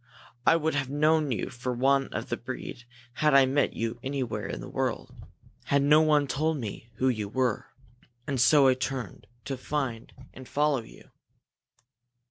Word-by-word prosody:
I - - +7
would 160 -1 0
have 140 -2 -1
known 150 0 +2
you 115 - -2
for 125 +1 -4
one 135 +2 +2
of - - -5
the - - 0
breed 120 - -7 0.4
had 150 -2 +4
I 135 -1 +7
met 140 +2 +1
you 115 +1 -3
anywhere 125 -7 -3
in - - -5
the - - -8
world, - - -3 0.5
had 140 0 +2
no 150 +2 +6
one 150 -2 +3
told 155 +4 -1
me 115 -1 -7
who 130 - 0
you 110 -5 -1
were. 125 -1 -1 0.6
And 135 -4 -1
so 135 +2 +6
I 130 - +6
turned 130 -4 -5 0.2
to 135 - -3
find 130 -3 -3
you 130 - -15
and 130 -1 -11
follow 145 -3 +1
you." 110 - -16
135 Hz, 175 wpm, -28 LUFS, 125-145 Hz, 0.6 s, I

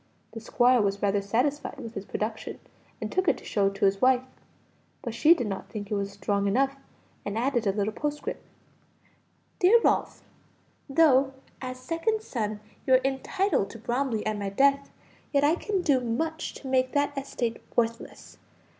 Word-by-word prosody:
The 225 - -6
squire 245 +1 +3
was 200 -1 0
rather 200 0 +2
satisfied 255 +9 -1
with 230 -4 -8
his 195 - -6
production, 220 +2 -4 0.4
and - - -4
took 375 0 0
it - - +3
to - - -14
show 200 -2 +1
it 195 - -2
to 200 +1 +1
his 195 0 +2
wife; 255 0 +4 0.8
but 235 - -4
she 305 +9 +6
did 245 - -2
not 195 -2 -5
think 205 -2 -7
it - - +1
was 200 -1 -1
strong 200 0 -1
enough, 270 +7 +2 0.5
and 205 +1 -4
added 240 -2 0
a - - +4
little 205 +2 -1
postscript 295 +4 -4 1.2
"DEAR 400 +6 +6
RALPH, - - +1 0.7
"Though, 270 -3 +4 0.3
as 255 -1 -5
second 390 - -1
son, 215 - -3 0.3
you 260 - +6
are 255 - +4
entitled 270 - 0
to 230 - -9
Bromley 240 -1 -1
at 215 -1 -1
my 200 -1 -2
death, 275 +6 +2 0.4
yet 280 -1 +3
I 295 +2 +5
can 380 +1 -1
do 280 -6 +3
much 315 +8 -2
to 270 - -9
make 255 -1 +1
the 285 0 +2
estate 245 -4 -3
worthless. 230 0 -2
250 Hz, 175 wpm, -27 LUFS, 210-280 Hz, 1.2 s, she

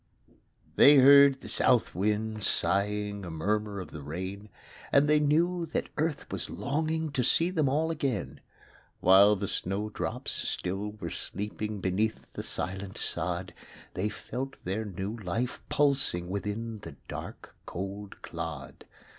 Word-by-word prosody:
They 145 - +9
heard 140 0 +7
the - - -9
South 125 -3 +4
wind 105 +3 -1
sighing 100 +1 0
A 90 - -6
murmur 100 +5 -1
of 90 - -8
the 75 - -8
rain; 95 +8 -6 0.4
And 140 +1 +5
they 150 0 +4
knew 165 +4 +2
that 160 - -2
Earth 155 -1 -1
was - - -3
longing 160 +1 -2
To 130 -2 0
see 165 +8 +3
them 155 -7 +1
all 155 +4 +1
again. 135 - -2 0.6
While 100 +3 +7
the 100 0 -3
snow 100 +4 -2
drops - - -4
still 100 +3 -3
were 105 - -6
sleeping 105 +1 -4
Beneath 100 +4 -1
the - - -4
silent 95 +1 -3
sod; - - -2 0.4
They 100 +4 -1
felt 125 +5 -5
their 100 +5 -2
new 100 +2 -4
life 110 +5 -3
pulsing 135 -12 +2
Within 105 +3 -4
the 80 -7 -10
dark, - - -8
cold 100 +2 -6
clod. - - -7
105 Hz, 140 wpm, -29 LUFS, 95-140 Hz, 0.6 s, They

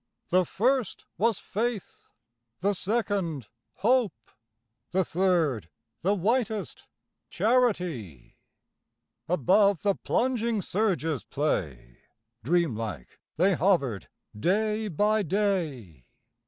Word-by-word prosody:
The 185 +1 +3
first 250 - 0
was 225 -1 +2
Faith; 225 0 -4 0.5
the 200 +2 +2
second, 195 - -1 0.4
Hope; 215 - +1 0.6
The 185 0 +1
third 160 - +1 0.3
the 195 +4 +2
whitest 220 +2 -1 0.4
Charity. 180 - 0 0.9
Above 185 - +3
the 200 -1 +3
plunging 235 0 0
surge's 170 - 0
play 70 - -3 0.4
Dream 165 -1 +1
like 105 - -6 0.2
they 190 +4 +3
hovered, 155 - +1 0.3
day 215 - +1
by 210 +4 +2
day. 160 - -2
185 Hz, 85 wpm, -27 LUFS, 145-215 Hz, 0.9 s, The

